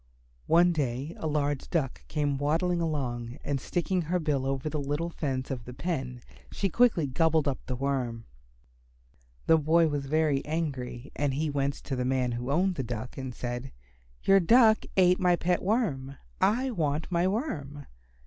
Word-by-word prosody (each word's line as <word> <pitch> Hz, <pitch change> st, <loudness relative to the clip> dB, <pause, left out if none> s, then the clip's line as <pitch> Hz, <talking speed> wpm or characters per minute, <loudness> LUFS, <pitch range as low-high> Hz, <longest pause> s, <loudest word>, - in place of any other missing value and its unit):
One 175 Hz, +1 st, +5 dB
day 140 Hz, 0 st, -2 dB
a 160 Hz, -, -2 dB
large 145 Hz, -2 st, -1 dB
Duck 150 Hz, -7 st, -2 dB
came 145 Hz, -3 st, -1 dB
waddling 170 Hz, +4 st, +1 dB
along, 125 Hz, -6 st, -3 dB
and 140 Hz, -2 st, -2 dB
sticking 180 Hz, +3 st, -1 dB
her 170 Hz, +3 st, 0 dB
bill 145 Hz, -5 st, 0 dB
over 135 Hz, +2 st, -2 dB
the 155 Hz, 0 st, -2 dB
little 145 Hz, +4 st, -2 dB
fence 135 Hz, -5 st, -3 dB
of 125 Hz, -3 st, -4 dB
the 125 Hz, -, -9 dB
pen 135 Hz, -5 st, -3 dB, 0.3 s
she 195 Hz, -, -1 dB
quickly 225 Hz, -6 st, +3 dB
gobbled 155 Hz, +3 st, +2 dB
up 135 Hz, -, -1 dB
the 125 Hz, -, -2 dB
Worm. 125 Hz, -4 st, -2 dB, 1.2 s
The 160 Hz, -, +5 dB
boy 160 Hz, +2 st, +3 dB
was 145 Hz, -2 st, -3 dB
very 150 Hz, -2 st, +1 dB
angry 140 Hz, -5 st, -4 dB
and 140 Hz, -2 st, 0 dB
he 155 Hz, +1 st, -1 dB
went 140 Hz, 0 st, 0 dB
to 135 Hz, -, -3 dB
the 125 Hz, -, -1 dB
man 130 Hz, -1 st, +1 dB
who 120 Hz, +2 st, -4 dB
owned 180 Hz, +5 st, +1 dB
the 135 Hz, -, -1 dB
Duck, 120 Hz, +1 st, -5 dB
and 130 Hz, -1 st, -5 dB
said, 120 Hz, +2 st, -5 dB, 0.5 s
"Your 195 Hz, 0 st, +6 dB
Duck 220 Hz, +4 st, +5 dB
ate 180 Hz, -1 st, +5 dB
up -, -, -8 dB
my 180 Hz, -1 st, +4 dB
pet 175 Hz, +1 st, 0 dB
Worm. 155 Hz, -, -1 dB, 0.2 s
I 255 Hz, +5 st, +2 dB
want 155 Hz, -6 st, -1 dB
my 175 Hz, +1 st, +2 dB
Worm." 145 Hz, -, -3 dB
145 Hz, 175 wpm, -28 LUFS, 135-170 Hz, 1.2 s, Your